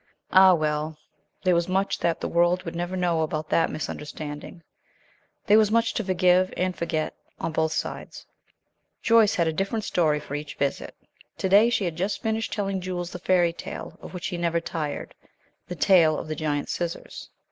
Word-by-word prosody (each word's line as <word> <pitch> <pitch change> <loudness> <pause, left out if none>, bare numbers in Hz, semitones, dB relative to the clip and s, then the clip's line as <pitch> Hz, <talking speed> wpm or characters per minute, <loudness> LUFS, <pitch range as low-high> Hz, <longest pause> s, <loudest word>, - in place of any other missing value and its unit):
Ah, 190 -1 +7
well, 155 0 -2 0.5
there 185 -2 +4
was 170 0 +1
much 190 +2 0
that 170 -1 0
the - - -3
world 175 +2 +2
would 165 -1 -6
never 175 +2 -3
know 175 -3 +1
about 155 0 -2
that 165 - +3
misunderstanding. 150 +1 -6 0.8
There 210 +2 +6
was 215 -2 +3
much 230 +1 +2
to 225 - -1
forgive 185 -1 +3
and 185 0 0
forget 160 -2 -2 0.3
on 165 - -2
both 160 0 0
sides. - - -5 0.8
Joyce 225 -2 +5
had 170 -2 +2
a 160 - 0
different 195 +5 -2
story 155 -4 +2
for 150 - -9
each 145 0 -5
visit. 140 -1 -2 0.4
To - - -1
day 205 +4 +6
she 220 -4 0
had 165 -2 -3
just 195 +4 -2
finished 220 0 -1
telling 195 -2 -2
Jules 180 -1 -4
the 180 - -7
fairy 175 -2 +2
tale - - -8
of - - -10
which 180 +3 -4
he 180 - -4
never 170 -1 0
tired, 160 -3 -4 0.5
the 180 - -5
tale 165 -4 +4
of - - -6
the 155 - -3
giant 145 -1 -2
scissors. 170 -1 -5
175 Hz, 185 wpm, -25 LUFS, 160-190 Hz, 0.8 s, Ah